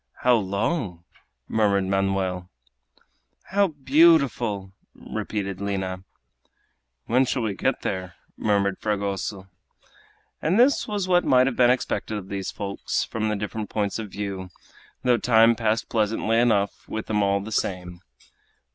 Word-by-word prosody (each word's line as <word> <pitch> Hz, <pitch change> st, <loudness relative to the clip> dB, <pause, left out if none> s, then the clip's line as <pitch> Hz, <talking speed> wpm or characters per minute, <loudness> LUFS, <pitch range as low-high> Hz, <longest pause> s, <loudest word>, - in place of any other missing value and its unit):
"How 125 Hz, -, +5 dB
long!" 100 Hz, -, -2 dB, 0.4 s
murmured 100 Hz, -3 st, +2 dB
Manoel. 95 Hz, -2 st, -1 dB, 1.0 s
"How 200 Hz, 0 st, +3 dB
beautiful!" 135 Hz, -, +3 dB, 0.2 s
repeated 100 Hz, -3 st, -4 dB
Lina. 95 Hz, -2 st, -3 dB, 1.0 s
"When 125 Hz, +3 st, +3 dB
shall 125 Hz, -1 st, -1 dB
we 105 Hz, -2 st, -1 dB
get -, -, -1 dB
there?" 90 Hz, -2 st, -3 dB, 0.2 s
murmured 100 Hz, -2 st, 0 dB
Fragoso. 100 Hz, -2 st, -3 dB, 0.9 s
And 180 Hz, +8 st, +2 dB
this 265 Hz, +4 st, +4 dB
was 205 Hz, -3 st, -2 dB
what 180 Hz, -1 st, +4 dB
might 130 Hz, 0 st, +4 dB
have 135 Hz, -2 st, -1 dB
been 120 Hz, -1 st, +5 dB
expected 125 Hz, -3 st, -1 dB
of 95 Hz, -2 st, -8 dB
these 100 Hz, -1 st, -3 dB
folks 100 Hz, -1 st, -3 dB
from 110 Hz, -1 st, -2 dB
the 105 Hz, -, 0 dB
different 105 Hz, +1 st, -4 dB
points 105 Hz, 0 st, -1 dB
of 110 Hz, -2 st, -5 dB
view, 95 Hz, -2 st, -5 dB, 0.5 s
though 125 Hz, -1 st, +4 dB
time 115 Hz, -1 st, +5 dB
passed 115 Hz, 0 st, 0 dB
pleasantly 110 Hz, +1 st, +1 dB
enough 110 Hz, -4 st, +1 dB
with 110 Hz, -, -4 dB
them 105 Hz, -1 st, 0 dB
all 100 Hz, 0 st, +2 dB
the 105 Hz, +3 st, -7 dB
same. 90 Hz, -4 st, -3 dB
105 Hz, 135 wpm, -24 LUFS, 95-120 Hz, 1.0 s, How